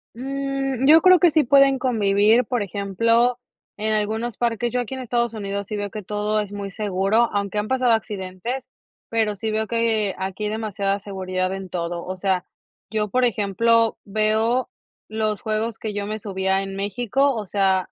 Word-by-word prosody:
Mm 270 Hz, 0 st, -2 dB
yo 320 Hz, +2 st, +8 dB
creo 370 Hz, +1 st, +7 dB
que 340 Hz, 0 st, +5 dB
sí 310 Hz, 0 st, +4 dB
pueden 275 Hz, +1 st, +5 dB
convivir, 220 Hz, -1 st, +3 dB
por 245 Hz, -2 st, -1 dB
ejemplo, 230 Hz, +6 st, +1 dB, 0.4 s
en 215 Hz, +1 st, 0 dB
algunos 220 Hz, +2 st, -1 dB
parques. 235 Hz, 0 st, 0 dB
Yo 250 Hz, -, 0 dB
aquí 245 Hz, +2 st, -4 dB
en 260 Hz, -, -5 dB
Estados 235 Hz, -1 st, -1 dB
Unidos 200 Hz, -1 st, -4 dB
sí 215 Hz, -, -4 dB
veo 205 Hz, -1 st, -3 dB
que 215 Hz, -2 st, -6 dB
todo 210 Hz, +2 st, -1 dB
es 205 Hz, -1 st, -3 dB
muy 200 Hz, -1 st, -5 dB
seguro, 205 Hz, +3 st, +1 dB
aunque 200 Hz, 0 st, -2 dB
han 210 Hz, +1 st, -1 dB
pasado 255 Hz, -2 st, +2 dB
accidentes, 210 Hz, +3 st, -3 dB, 0.5 s
pero 220 Hz, -2 st, 0 dB
sí 220 Hz, +2 st, -3 dB
veo 220 Hz, 0 st, 0 dB
que 225 Hz, -4 st, 0 dB
aquí 190 Hz, +2 st, -3 dB
demasiada 205 Hz, -2 st, -2 dB
seguridad 185 Hz, -2 st, -3 dB
en 195 Hz, -1 st, -6 dB
todo. 170 Hz, -1 st, -4 dB
O 185 Hz, +1 st, -4 dB
sea, 190 Hz, -1 st, 0 dB, 0.5 s
yo, 210 Hz, -2 st, -1 dB
por 255 Hz, +4 st, +2 dB
ejemplo, 230 Hz, +1 st, +2 dB
veo 220 Hz, +4 st, +1 dB, 0.4 s
los 215 Hz, -2 st, -1 dB
juegos 220 Hz, +1 st, -2 dB
que 215 Hz, -2 st, -4 dB
yo 205 Hz, 0 st, -3 dB
me 215 Hz, +1 st, -4 dB
subía 190 Hz, -1 st, -1 dB
en 195 Hz, 0 st, -6 dB
México, 245 Hz, +7 st, 0 dB
o 215 Hz, -3 st, -4 dB
sea, 190 Hz, -1 st, +1 dB
215 Hz, 175 wpm, -22 LUFS, 200-235 Hz, 0.5 s, yo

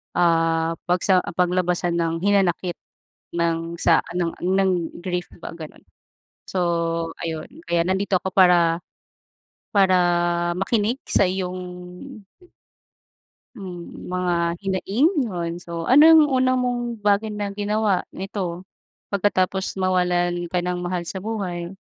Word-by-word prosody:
ah, 165 Hz, -1 st, +2 dB
pagsa 180 Hz, +1 st, +3 dB
paglabasan 180 Hz, -1 st, +1 dB
ng 165 Hz, 0 st, 0 dB
hinanakit 190 Hz, -3 st, +1 dB, 0.6 s
ng 170 Hz, 0 st, -1 dB
sa 170 Hz, -2 st, +4 dB
ng 175 Hz, -2 st, -1 dB
ng 190 Hz, +1 st, +2 dB, 0.3 s
grief 180 Hz, -1 st, -2 dB
ba, -, -, -6 dB
gano'n. 160 Hz, -2 st, -10 dB, 0.7 s
So 190 Hz, -, -3 dB, 0.7 s
ayun, 160 Hz, -1 st, -4 dB, 0.2 s
kaya 170 Hz, -1 st, +2 dB
nandito 190 Hz, 0 st, +1 dB
ako 190 Hz, -, -3 dB
para 175 Hz, -3 st, +5 dB, 1.0 s
para 190 Hz, -2 st, +4 dB, 0.6 s
makinig 220 Hz, +6 st, 0 dB
sa -, -, +3 dB
iyong 185 Hz, 0 st, -2 dB, 2.0 s
hmm, 180 Hz, -5 st, -9 dB
mga 175 Hz, -2 st, 0 dB
hinaing. 195 Hz, -, +1 dB, 0.2 s
'Yun, 170 Hz, -4 st, -3 dB
so 170 Hz, -1 st, -6 dB
anong 310 Hz, -, +7 dB
unang 255 Hz, 0 st, +3 dB
mong 245 Hz, -1 st, -1 dB, 0.2 s
bagay 205 Hz, +1 st, +2 dB
na 210 Hz, -1 st, -4 dB
ginawa 205 Hz, -1 st, 0 dB, 0.2 s
nito, 185 Hz, -2 st, -4 dB, 0.5 s
pagkatapos 190 Hz, -1 st, 0 dB
mawalan 180 Hz, -2 st, +1 dB
ka 175 Hz, 0 st, -1 dB
ng 180 Hz, 0 st, -2 dB
mahal 175 Hz, 0 st, -3 dB
sa 190 Hz, +3 st, -5 dB
buhay? 185 Hz, -5 st, -4 dB
180 Hz, 115 wpm, -23 LUFS, 175-200 Hz, 2.0 s, anong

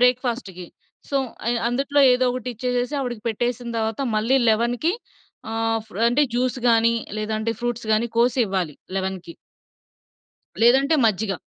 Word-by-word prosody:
బ్రేక్‌ఫాస్ట్‌కి. 240 Hz, -7 st, 0 dB, 0.4 s
సో, 280 Hz, -, -1 dB, 0.3 s
అయి 240 Hz, +1 st, +1 dB
అందుట్లో 275 Hz, +4 st, +1 dB
ఏదో 250 Hz, +1 st, +2 dB
ఒకటి 255 Hz, 0 st, -5 dB
ఇచ్చేసేసి 250 Hz, +4 st, -2 dB
ఆవిడికి 240 Hz, -5 st, -4 dB
పెట్టేసిన 240 Hz, +2 st, -2 dB
తవాత 220 Hz, +2 st, -2 dB, 0.2 s
మళ్ళీ 230 Hz, +5 st, +2 dB
11కి 240 Hz, +9 st, +1 dB, 0.6 s
ఆహ్, 225 Hz, 0 st, 0 dB
ఫ్ర్ 220 Hz, -1 st, -8 dB
అంటే, 245 Hz, +5 st, +3 dB
జ్యూస్ 255 Hz, +1 st, 0 dB
గానీ, 230 Hz, 0 st, +4 dB, 0.2 s
లేదంటే 215 Hz, +1 st, -2 dB
ఫ్రూట్స్ 240 Hz, -1 st, -3 dB
గానీ 215 Hz, +2 st, +2 dB
కోసి 245 Hz, +2 st, +3 dB
ఇవ్వాలి 185 Hz, -6 st, -2 dB, 0.2 s
11కి. 190 Hz, -3 st, -4 dB, 1.3 s
లేదంటే 270 Hz, +6 st, +5 dB
మజ్జిగ. 215 Hz, -1 st, 0 dB
235 Hz, 130 wpm, -23 LUFS, 215-250 Hz, 1.3 s, లేదంటే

